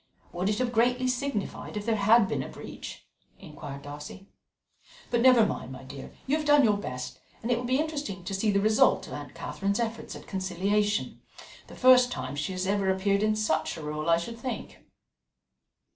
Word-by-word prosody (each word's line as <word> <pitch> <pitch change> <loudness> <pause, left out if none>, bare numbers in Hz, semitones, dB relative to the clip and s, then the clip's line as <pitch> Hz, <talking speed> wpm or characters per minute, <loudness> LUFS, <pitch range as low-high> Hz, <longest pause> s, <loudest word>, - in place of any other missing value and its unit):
"Would 180 +3 0
it 210 - 0
have 250 -1 0
greatly 250 +2 +2
signified 255 -5 -3
if 205 - -4
there 230 -1 +2
had 215 +1 +5
been - - -1
a - - -6
breach?" - - -9 0.3
inquired 150 -5 -9
Darcy. 150 +6 -9 0.9
"But 240 -1 +2
never 250 -3 +7
mind, 165 - -4
my 130 0 -9
dear, 135 +1 -9
you 275 - +2
have 305 - -4
done 290 -1 +6
your 210 -3 +4
best, 125 -8 -6 0.2
and 235 - -1
it 240 - +3
will 245 - -4
be 255 +2 +2
interesting 290 - -3
to 185 - -5
see 195 +3 +1
the 200 -1 +3
result 215 +2 +4
of - - -9
Aunt - - -8
Catherine's 200 +3 -2
efforts 230 -1 -3
at - - -10
conciliation 200 +2 -1 0.5
the - - -12
first 250 -1 +6
time 130 - -4
she 150 +5 -2
has 185 0 -2
ever 195 0 +1
appeared 195 +1 +2
in 215 0 +2
such 215 -4 0
a 160 - -7
role, 150 +2 -3
I 165 - +6
should 230 +7 -6
think." 250 0 -5
205 Hz, 195 wpm, -28 LUFS, 185-240 Hz, 0.9 s, never